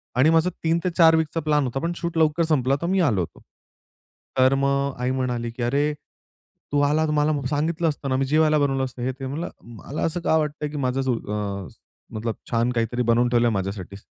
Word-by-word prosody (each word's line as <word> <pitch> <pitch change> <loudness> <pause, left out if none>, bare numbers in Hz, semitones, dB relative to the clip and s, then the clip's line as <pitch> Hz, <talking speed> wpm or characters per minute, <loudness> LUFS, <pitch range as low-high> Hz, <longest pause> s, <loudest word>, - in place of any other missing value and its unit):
आणि 130 +5 +5
माझा 165 +2 +3
3-4 165 0 +4
वीकचा 160 0 0
प्लॅन 150 -1 +2
होता, 130 +1 -2
पण 170 +4 -2
शूट 170 -1 -4
लवकर 160 +1 +3
संपला 140 -5 +2
तर 170 - -1
मी 190 +1 +1
आलो 115 - +2
होतो. 85 - -7 1.0
तर 130 +1 +5
मग 140 0 +1
आई 125 +1 0
म्हणाली, 125 -3 -2
"की 120 +1 -5
अरे! 140 +5 +1 0.8
तू 145 - +2
आलास 155 +1 +1
मला 150 +1 +2 0.2
सांगितलं 160 +3 0
असतं 145 -2 -4
ना? 130 - +1
मी 135 - +1
जेवायला 155 +2 +3
बनवलं 135 -2 +1
असतं." 125 -1 -8
हे 130 - 0
ते, 135 +1 -8
म्हणलं, 150 +6 -4
"मला 120 +5 -7
असं 165 +2 -1
का 160 - +2
वाटतं 150 -1 -1
आहे - - -3
की 150 - -5
माझ 125 - -1
जो 130 -1 +1 0.5
अ, - - -9 0.5
मतलब 110 +1 -3 0.2
छान 120 +1 +2
काहीतरी 120 +1 -1
बनवून 120 +1 +3
ठेवलं 120 0 +3
आहे 115 - +1
माझ्यासाठी. 100 0 -4
140 Hz, 210 wpm, -24 LUFS, 125-160 Hz, 1.0 s, आणि